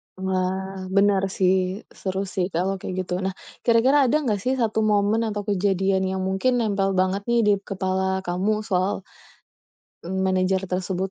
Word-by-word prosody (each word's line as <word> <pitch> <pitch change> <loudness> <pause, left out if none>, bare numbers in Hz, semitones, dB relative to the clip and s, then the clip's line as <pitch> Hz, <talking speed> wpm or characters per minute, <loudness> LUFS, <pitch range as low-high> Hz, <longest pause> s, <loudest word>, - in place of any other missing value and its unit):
Wah, 190 0 -2
benar 200 -1 +4 0.2
sih, 185 0 +4 0.5
seru 190 0 -2
sih 180 -2 0
kalau 185 +3 +1
kayak 185 - -5
gitu. 180 -1 -3
Nah, 190 - -1 0.3
kira-kira 240 +4 +4
ada 270 - +2
nggak 210 -6 0
sih 255 - +1
1 220 -1 +1
momen 205 +2 +2
atau 205 -1 -3
kejadian 195 -1 +1
yang 190 0 -2
mungkin 195 +7 +1
nempel 200 -3 +1
banget 190 +2 +1
nih, 235 0 +3
di - - +6 0.2
kepala 190 0 -1
kamu 185 +4 0 0.2
soal 185 +1 +1 1.3
manager 185 0 +1
tersebut? 185 +1 -2
190 Hz, 150 wpm, -24 LUFS, 185-205 Hz, 1.3 s, di